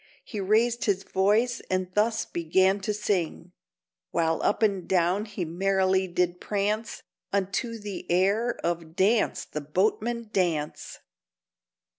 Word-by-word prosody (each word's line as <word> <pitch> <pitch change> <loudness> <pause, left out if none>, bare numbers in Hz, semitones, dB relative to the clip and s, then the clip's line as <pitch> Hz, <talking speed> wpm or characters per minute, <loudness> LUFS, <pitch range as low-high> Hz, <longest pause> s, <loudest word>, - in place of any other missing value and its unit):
He 215 - -6
raised 225 +5 +2
his 195 -2 +1
voice, 215 +6 +2
and 185 -1 -1
thus 220 +3 +1
began 190 +4 +2
to 200 +2 -2
sing: 205 -5 -2 0.6
(While 165 -1 0
up 215 - +1
and 195 -4 +1
down 185 +3 +2
he 200 -4 -4
merrily 190 +2 +1
did 180 0 -1
prance) 210 +2 -2 0.3
Unto 200 +4 -1
the 205 -2 -7
air 200 +7 +2
of 170 -1 -3
_Dance, 210 +5 +2
the 150 - -5
Boatman, 215 +8 -1
dance! 165 -6 -1
195 Hz, 125 wpm, -27 LUFS, 180-215 Hz, 0.6 s, raised